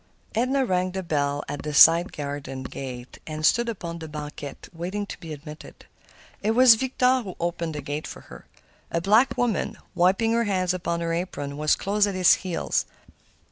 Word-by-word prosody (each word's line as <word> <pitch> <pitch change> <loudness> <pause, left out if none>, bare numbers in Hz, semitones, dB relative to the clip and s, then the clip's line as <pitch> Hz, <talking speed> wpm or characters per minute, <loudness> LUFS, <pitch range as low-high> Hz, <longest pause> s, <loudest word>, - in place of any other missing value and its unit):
Edna 260 +4 +1
rang 185 -3 0
the 190 0 -3
bell 145 -3 -1
at 145 - -5
this 150 -1 -2
side 170 +2 +7
garden 140 -2 -5
gate, 125 -1 -8
and 155 0 -3
stood 235 +6 +3
upon 170 -6 -5
the 160 - -7
banquette, 150 -2 -8
waiting 185 +5 -4
to - - -9
be 165 - -9
admitted. 150 +1 -10 0.6
It 220 +2 +1
was 255 -1 +8
Victor 255 +1 +1
who 190 -6 -8
opened 170 -2 -2
the 150 - -5
gate 145 +2 -4
for - - -9
her. - - -14 0.4
A 170 - 0
black 215 +9 +3
woman, 240 -4 0 0.2
wiping 190 +6 +2
her 235 0 +2
hands 185 -3 0
upon 170 -2 -2
her 165 0 -1
apron, 145 -5 -4
was 150 +1 +2
close 205 +1 +1
at 200 - -3
his 185 -2 +6
heels. 180 -3 -1
170 Hz, 180 wpm, -25 LUFS, 150-205 Hz, 0.6 s, was